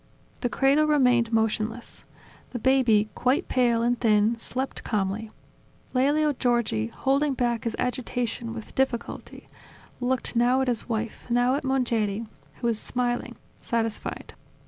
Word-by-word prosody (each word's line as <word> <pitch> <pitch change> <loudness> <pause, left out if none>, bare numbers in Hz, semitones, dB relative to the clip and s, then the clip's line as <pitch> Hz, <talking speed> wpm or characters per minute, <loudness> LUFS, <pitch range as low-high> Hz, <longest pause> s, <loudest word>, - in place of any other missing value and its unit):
The 245 - -1
cradle 275 +6 +3
remained 250 -6 +3
motionless: 225 +1 -1 0.5
the - - -2
baby, 235 -4 +3
quite 255 +3 +1
pale, 240 -2 +2
and 240 0 +1
thin, 215 0 +3
slept 260 +3 -3
calmly. 210 +1 -1 0.6
Lelio 290 +3 +3
Giorgi, 235 - 0
holding 275 - 0
back 240 -2 0
his 230 - -1
agitation 245 -2 -2
with 225 - -9
difficulty, 260 -3 -2 0.5
looked 250 0 -1
now 245 +2 +4
at 265 - 0
his 245 -1 -2
wife, 225 0 -3
now 245 +1 +3
at 280 - -1
Mongeri, 230 -5 0 0.3
who - - -7
was 230 -2 +1
smiling, 245 0 -2 0.3
satisfied. 225 -2 -3
240 Hz, 130 wpm, -26 LUFS, 225-260 Hz, 0.6 s, now